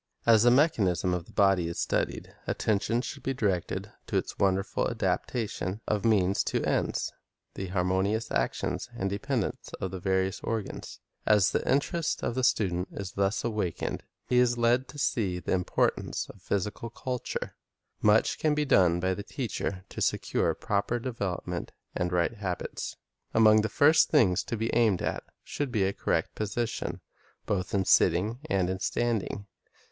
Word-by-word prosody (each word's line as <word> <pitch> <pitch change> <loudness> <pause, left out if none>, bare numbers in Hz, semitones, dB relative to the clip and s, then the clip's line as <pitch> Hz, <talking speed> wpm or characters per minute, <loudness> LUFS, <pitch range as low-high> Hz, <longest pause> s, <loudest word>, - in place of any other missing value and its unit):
As 115 -2 +6
the 120 - +6
mechanism 110 - +3
of 90 -2 -2
the - - -16
body 95 -4 +3
is 85 - -5
studied, - - -1
attention 110 +3 +1
should 140 - -6
be 135 +1 -2
directed 100 -8 -1 0.2
to - - 0
its - - -3
wonderful 95 0 +1
adaptation 105 -4 -2
of 105 -2 0
means 100 -4 +3
to - - 0
ends, - - 0 0.4
the 95 - -5
harmonious 95 +4 0
action 60 -1 0 0.2
and 95 0 -1
dependence 120 +1 -2
of 95 - -3
the 95 - -5
various 95 +1 0
organs. 110 -3 -4 0.3
As 105 -3 +5
the - - +1
interest 150 +4 0
of - - 0
the 130 +1 -1
student 95 -7 +1
is 95 -2 -5
thus 100 +2 0
awakened, 105 -7 -2
and - - -34 0.2
he 125 - +3
is 120 -1 +3
led 120 +2 +2
to 150 - -11
see 100 -10 0
the 90 - -4
importance 90 -1 0
of 100 - -20
physical 105 +5 -2
culture, 125 +2 -4 0.5
much 105 +1 +3
can 155 -1 +2
be 150 0 +1
done 90 -9 +4
by 95 +1 +1
the 100 - -5
teacher 100 -5 -4
to - - -7
secure - - +1
proper 100 +4 -1
development 115 -7 -4 0.2
and 90 0 -1
right 90 +6 +1
habits. 95 -4 -4 0.4
Among 110 -1 +6
the 110 - -1
first 155 +8 +5
things 105 - +4
to 115 - -3
be 115 +1 -2
aimed 110 -6 +3
at - - -2 0.2
should 145 -3 -3
be 110 -5 +1
a 95 +1 +1
correct - - -1
position, 110 +2 -3 0.4
both 95 -1 -1
in 95 -1 +1
sitting 95 +10 +3
and 95 -2 +2
in 95 0 -2
standing. 110 -2 -1
105 Hz, 165 wpm, -28 LUFS, 95-120 Hz, 0.5 s, As